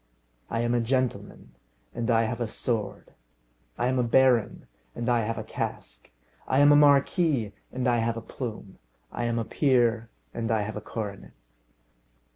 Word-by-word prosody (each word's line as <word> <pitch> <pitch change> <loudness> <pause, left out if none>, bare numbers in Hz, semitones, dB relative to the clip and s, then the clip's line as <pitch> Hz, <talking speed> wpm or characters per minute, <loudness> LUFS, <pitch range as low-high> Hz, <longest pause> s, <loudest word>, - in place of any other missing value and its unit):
I 115 - -1
am 120 0 0
a 120 - +2
gentleman, 130 +1 -2 0.4
and 120 0 -3
I 115 -1 +4
have 115 +2 -3
a 120 - 0
sword; 110 -1 -3 0.6
I - - 0
am 130 +1 +1
a - - +2
baron, 120 -2 +2 0.3
and 120 -1 -4
I 120 -1 +3
have 115 +1 -3
a - - -4
casque; - - -6 0.4
I 130 - +1
am 145 +1 +7
a - - +7
marquis, 145 - +3 0.2
and 130 0 -2
I 120 -1 +3
have 115 0 -1
a - - -5
plume; 110 -6 -7 0.3
I 120 - -3
am 120 0 -1
a 115 - -1
peer, 120 -5 +1 0.2
and 115 -1 -3
I 110 -2 +1
have 105 0 -5
a 105 - -5
coronet. 105 -4 -7
120 Hz, 175 wpm, -26 LUFS, 115-130 Hz, 0.6 s, am